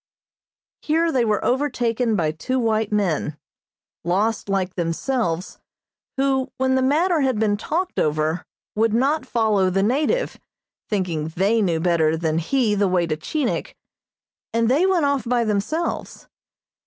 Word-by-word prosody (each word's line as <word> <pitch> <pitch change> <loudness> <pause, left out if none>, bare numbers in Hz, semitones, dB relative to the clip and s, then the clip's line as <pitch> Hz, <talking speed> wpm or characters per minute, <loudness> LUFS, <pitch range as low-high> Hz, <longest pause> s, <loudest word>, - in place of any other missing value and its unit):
Here 325 +2 +1
they 255 -4 +2
were 215 -2 0
overtaken 245 -4 0
by 160 -5 +1
two 210 +12 -3
white 220 -3 0
men, 170 -7 0 0.7
lost 205 +5 0
like 190 -2 0
themselves, 175 +1 -2 0.6
who, 270 -1 +1
when 260 0 +1
the 260 - +2
matter 315 +5 +2
had 260 -4 +1
been 210 -1 +2
talked 340 - -2
over, 155 +2 0 0.3
would 220 +1 +2
not 270 +3 +1
follow 215 -6 +2
the 195 +1 +1
native, 300 - 0 0.5
thinking 175 -7 -1
they 205 +5 +2
knew 170 -5 +1
better 160 -2 +2
than 160 -1 0
he 230 +5 +1
the 205 -1 +2
way 180 -2 +1
to 160 -2 -1
Chinik, 255 - -3 0.8
and 230 0 +1
they 320 +8 +3
went 360 -5 +2
off 280 -4 +1
by 240 +1 +1
themselves. 220 +11 -2
220 Hz, 140 wpm, -22 LUFS, 180-265 Hz, 0.8 s, they